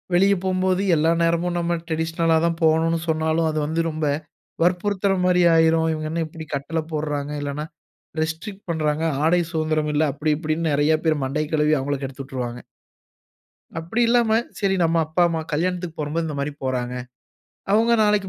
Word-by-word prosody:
வெளிய 195 +3 +5
போம்போது 185 0 +1
எல்லா 160 +1 +3
நேரமும் 170 +1 +1
நம்ப 170 0 0
டிரடிஷனலா 165 0 +1
தான் 165 -1 -1
போவணுன்னு 160 +1 +3
சொன்னாலும் 160 +1 +1
அது 155 - -1
வந்து 160 +2 0
ரொம்ப 155 -1 -3 0.6
வற்புறுத்துறமாரி 180 0 +2
ஆயிரும். 160 0 +4
இவுங்க 155 0 -4
என்ன 165 0 -1
இப்பிடி 160 0 -9
கட்டள 150 +4 -2
போடுறாங்க! 150 -1 -2
இல்லன்னா, 145 +1 -3 0.6
ரெஸ்ட்ரிக்ட் 165 +6 -4
பண்ணுறாங்க. 155 -1 0 0.2
ஆடை 175 +2 +4
சுதந்திரம் 155 -2 0
இல்ல, 150 - +3
அப்பிடி 150 +2 0
இப்பிடின்னு 160 0 -1
நிறைய 145 +2 +3
பேர் 155 -3 +2
மண்டைய 150 +3 -2
கழுவி 150 0 +3
அவுங்கள 140 +1 -2
கெடுத்து 135 +1 -6
விட்ருவாங்க. 125 -2 -5 1.2
அப்பிடி 170 +9 -1
இல்லாம 235 -1 +3 0.3
சரி 195 -2 +1
நம்ப 165 0 +2
அப்பா, 160 +3 +1
அம்மா 165 -1 -2
கல்யாணத்துக்கு 175 +1 -1
போகும்போது 150 +3 -1
இந்தமாரி 145 -1 -3
போறங்க. 125 -1 -2 0.8
அவுங்க 225 +3 +4
நாளைக்கு 210 -2 +2
160 Hz, 150 wpm, -23 LUFS, 150-175 Hz, 1.2 s, வெளிய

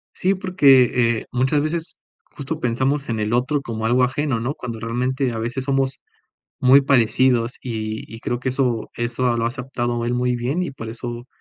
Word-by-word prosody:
Sí, 190 +2 +2
porque, 130 - +4
eh, - - -11
muchas 130 +4 +2
veces 160 +2 -2 0.3
justo 150 +3 -6
pensamos 130 +3 0
en 110 - -1
el 105 +2 -1
otro 135 +4 +1
como 110 -3 -4
algo 125 +2 +3
ajeno, 130 -1 0
¿no?, 120 +5 -2
cuando 120 -5 -6
realmente 125 +3 -1
a 115 - -4
veces 120 +3 -3
somos 135 -1 0 0.6
muy 130 +2 +6
parecidos 125 -2 +3
y 110 -3 -4
y - - -8
creo 120 - -2
que 130 - -2
eso 125 -4 -1
eso 120 +1 0
lo 115 - 0
ha 115 - +2
aceptado 120 -2 -3
él 120 - 0
muy 125 0 0
bien 135 +9 -1
y 175 - -3
por 115 -5 -8
eso 120 +1 -6
125 Hz, 190 wpm, -21 LUFS, 120-135 Hz, 0.6 s, muy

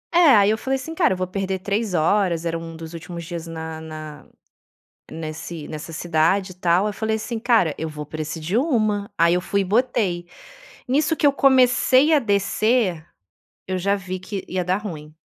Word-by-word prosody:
É, 335 -7 +7
aí 205 0 +5
eu 220 - +1
falei 265 0 -1
assim: 270 +5 -5
"Cara, 325 - +2
eu - - -4
vou 185 - -1
perder 190 +1 -3
3 200 +1 -1
horas", 170 0 +2
era 165 0 -1
um 165 0 -8
dos 160 0 -9
últimos 170 +1 -7
dias 170 0 -6
na 160 -1 -6
na 155 -2 -9 0.9
nesse 160 0 -6
nessa 155 +1 -7
cidade 170 +4 +1
e - - -15
tal, 180 +2 +2
eu 210 - -2
falei 220 0 -1
assim: 225 +1 -4
"Cara, 220 - +2
eu 160 - -4
vou 150 -1 -7
pra 155 +1 -5
esse 155 +2 -5
de 170 +7 -2
1". 215 -7 +1
Aí 170 +1 +4
eu 180 - +1
fui 200 +2 0
e - - 0
botei. 200 -5 0 0.6
Nisso 295 +5 +2
que 305 - +1
eu 285 - +5
comecei 265 +2 +4
a - - +6
descer, 205 - +1 0.6
eu 185 0 -2
já 200 +2 +1
vi 185 -1 -5
que 190 +1 -6
ia 185 0 -2
dar 180 +2 +1
ruim. 155 -8 -7
185 Hz, 200 wpm, -22 LUFS, 165-220 Hz, 0.9 s, É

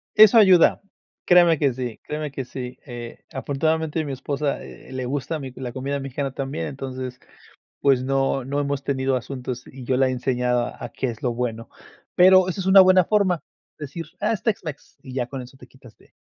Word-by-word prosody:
Eso 215 +1 +8
ayuda. 190 -5 +6 0.4
Créeme 175 -3 +6
que 140 -3 +2
sí, 125 -3 -5
créeme 150 -1 -4
que 135 -1 -4
sí, 125 0 -7
eh, 120 -2 -9
afortunadamente, 160 +2 -1
mi 140 - -5
esposa, 140 +2 -2
eh, - - -12
le 130 -1 -4
gusta 145 +4 -3
mi 135 -2 -7
la 125 -2 -5
comida 140 +2 -3
mexicana, 135 0 -4
también. 135 +2 -4
Entonces, 130 -2 -6 0.6
pues 135 -3 +3
no 135 -1 0
no 140 +2 -3
hemos 140 -1 -2
tenido 135 -1 0
asuntos. 125 -1 -5
Y 130 -1 -11
yo 130 +1 +1
la 135 -1 +4
he - - -1
enseñado, 125 -1 0
a - - -9
a - - -4
qué 130 - -3
es 115 -2 -7
lo 120 -2 0
bueno. 115 -2 -3 0.5
Pero 185 0 +6
eso 190 +2 -3
es 185 - -4
una 190 0 +8
buena 185 -1 +6
forma, 190 -6 +2 0.4
decir: 150 +3 -6
"Ah, 210 +2 +1
es 200 - -3
Tex 220 -6 -1
Mex". 150 -3 -8
Y 130 - -10
ya, 125 -2 -1
con 130 0 -6
eso 130 +2 -13
te 125 - -14
quitas 125 -2 -18
de - - -24
135 Hz, 205 wpm, -23 LUFS, 130-160 Hz, 0.6 s, Eso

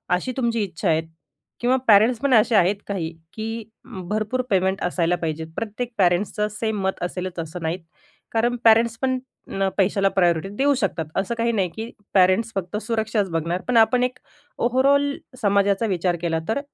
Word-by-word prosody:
अशी 255 +8 -3
तुमची 235 -3 0
इच्छा 185 0 -4
आहे 160 0 +3 0.6
किंवा 245 +2 +2
पॅरेंट्स 220 +3 +5
पण 280 +1 +1
असे 225 0 +4
आहेत 195 0 +4
काही 180 -5 -3 0.2
की 225 +1 -4 0.5
भरपूर 215 +4 -1
पेमेंट 190 0 +1
असायला 175 -1 +1
पाहिजेत. 160 -2 -4
प्रत्येक 230 +2 -4
पॅरेंट्सचं 195 +3 +2
सेम 215 -1 -2
मत 190 - -2
असेलच 180 0 -4
असं 165 +2 -6
नाहीत. 165 +3 -2 0.5
कारण 235 +2 +1
पॅरेंट्स 230 0 +5
पण 260 -1 +1 0.6
पैशाला 195 0 +2
प्रायोरिटी 175 -1 +1
देऊ 285 +1 +3
शकतात.असं 190 - -2
काही 235 0 +1
नाही 195 -5 0
की 225 +1 -5 0.2
पॅरेंट्स 190 +4 +4
फक्त 195 +1 -3
सुरक्षाच 220 -3 -1
बघणार. 165 +2 -1
पण 250 -2 +2
आपण 245 +2 +4
एक 250 0 -2 0.4
ओव्हरऑल 275 +3 +3 0.3
समाजाचा 200 0 +2
विचार 180 -2 0
केला 165 -2 0
तर 225 - 0
205 Hz, 160 wpm, -23 LUFS, 180-230 Hz, 0.6 s, पॅरेंट्स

